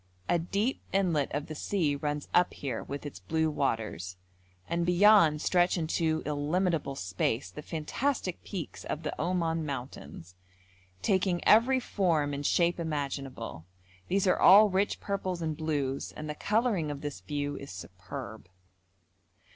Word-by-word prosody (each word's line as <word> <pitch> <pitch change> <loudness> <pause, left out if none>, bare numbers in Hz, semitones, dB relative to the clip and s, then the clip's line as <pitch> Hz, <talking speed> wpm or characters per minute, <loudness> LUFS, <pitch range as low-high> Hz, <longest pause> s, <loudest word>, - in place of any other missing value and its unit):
A 175 - +2
deep 200 +9 -1
inlet 175 -8 +1
of 145 +1 -2
the 155 - -7
sea 155 -2 0
runs 145 0 -3
up 180 - +3
here 130 -5 -4
with 140 +1 -6
its 145 - -7
blue 160 -1 0
waters, 110 - -2 0.5
and 170 +1 0
beyond 175 -3 +5
stretch 180 0 +3
into 160 -1 0
illimitable 150 +1 0
space 95 +5 -2
the 150 - -8
fantastic 185 - -2
peaks 185 -6 -6
of 155 - -4
the 150 - -2
Oman 165 -1 0
mountains, 125 - -7 0.7
taking 185 -2 +1
every 245 +5 +6
form 165 - 0
and 140 +1 -4
shape 175 +4 +2
imaginable; 135 - -4 0.4
these 195 +1 +1
are 185 - +3
all 205 +2 +8
rich 195 +2 +1
purples 190 -3 -3
and 160 -2 -2
blues, 145 -4 -2
and 155 - -7
the 150 - -3
colouring 210 -2 0
of 145 -1 -5
this 145 -1 -5
view 145 -1 -3
is 140 - -9
superb. 95 +4 -8
155 Hz, 145 wpm, -29 LUFS, 140-180 Hz, 0.7 s, all